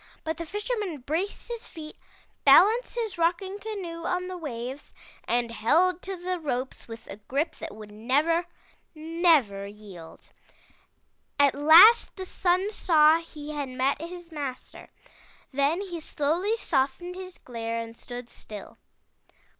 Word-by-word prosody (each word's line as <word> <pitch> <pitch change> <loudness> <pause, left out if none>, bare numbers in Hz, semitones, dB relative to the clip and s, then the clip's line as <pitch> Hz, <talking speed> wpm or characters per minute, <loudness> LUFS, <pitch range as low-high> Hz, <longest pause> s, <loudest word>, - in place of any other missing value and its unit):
But 320 0 -3
the 335 - -6
Fisherman 415 - -3
braced 325 +10 -3
his 470 -1 -6
feet, 310 -3 -9 0.5
balanced 455 +6 +6
his 445 -7 -3
rocking 360 +4 0
canoe 375 -6 -6
on 360 0 -1
the 370 - -5
waves, 265 -4 -6 0.3
and 235 -1 0
held 330 +12 +2
to 385 0 -5
the 360 0 -3
ropes 265 -4 -3
with 225 -1 -9
a 195 - -9
grip 275 +10 -2
that - - -7
would 210 -1 -11
never, 290 - +1 0.5
never 310 - +2
yield. 200 -5 -12 1.1
At 280 -2 +5
last 335 +11 +7
the 375 - -6
Sun 370 +3 +1
saw 320 -5 +5
he 305 -3 -9
had 290 -3 -3
met 265 +3 0
his 350 0 -8
master. 280 -5 -7 0.6
Then 285 +7 +1
he 360 -4 -5
slowly 325 +8 0
softened 290 -1 -1
his 370 0 -9
glare 230 -1 -4
and 230 0 -7
stood 245 0 -8
still. 210 -4 -10
315 Hz, 140 wpm, -27 LUFS, 255-365 Hz, 1.1 s, last